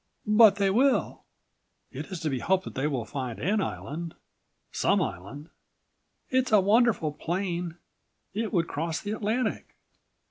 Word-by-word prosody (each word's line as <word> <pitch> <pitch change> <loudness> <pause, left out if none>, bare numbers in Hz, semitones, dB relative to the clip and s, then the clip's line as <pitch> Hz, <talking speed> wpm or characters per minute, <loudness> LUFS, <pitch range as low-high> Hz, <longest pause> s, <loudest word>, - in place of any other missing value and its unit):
"But 210 -1 +7
they 200 -1 +2
will." 260 +6 +1 0.7
"It - - -6
is 185 -4 -6
to 155 - -1
be 130 - -1
hoped 190 +5 +1
that - - -8
they 135 +3 -1
will 130 -6 -2
find 125 -1 -5
an 205 +2 0
island—some 165 -2 -4
island." 120 - -5 0.8
"It's 260 -1 +1
a 215 - +7
wonderful 205 -5 +3
plane. 175 +1 -3 0.6
It 220 +2 -2
would 170 -4 +1
cross 160 +2 -2
the 205 - -5
Atlantic!" 220 +4 -2
185 Hz, 140 wpm, -27 LUFS, 155-210 Hz, 0.8 s, But